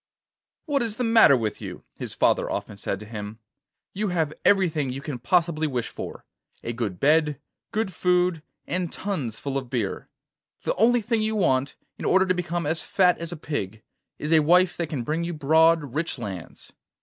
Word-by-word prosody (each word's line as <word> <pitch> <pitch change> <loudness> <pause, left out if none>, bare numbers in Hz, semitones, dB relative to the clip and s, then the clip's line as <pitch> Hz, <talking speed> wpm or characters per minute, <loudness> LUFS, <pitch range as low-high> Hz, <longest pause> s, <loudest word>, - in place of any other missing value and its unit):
'What 290 -4 +1
is 225 -3 -1
the 250 - -2
matter 225 - +6
with 110 -3 -3
you?' - - -7 0.2
his - - -5
father - - +2
often 105 - -4
said 100 - -2
to - - -8
him. 105 -1 -7 0.6
'You 210 +2 -1
have 165 -5 0
everything 165 -8 +3
you 130 +2 -4
can 140 -3 -5
possibly 160 +4 +1
wish 125 -5 -2
for: - - -8 0.4
a 120 - -3
good 110 -6 -3
bed, 150 -1 +3 0.3
good 215 -3 -1
food, 180 -1 +2 0.2
and 180 -2 -2
tuns 150 - -3
full 140 -1 -2
of 130 -2 -11
beer. 115 -6 -3 0.5
The - - 0
only 235 +3 +3
thing 225 +1 0
you 220 0 0
want, 135 -9 +1 0.2
in - - -5
order 190 0 +4
to 185 - +2
become 175 -2 -2
as 160 +2 -1
fat 180 -2 +2
as 170 0 -5
a 175 - -5
pig, 110 -9 -4 0.3
is 150 +2 -1
a 160 - +7
wife 175 +4 +4
that 170 -3 -2
can 140 -6 -3
bring 155 +7 -1
you 170 0 -3
broad, 160 -1 +3
rich 155 0 -2
lands. 100 -8 -8
160 Hz, 190 wpm, -25 LUFS, 130-180 Hz, 0.6 s, a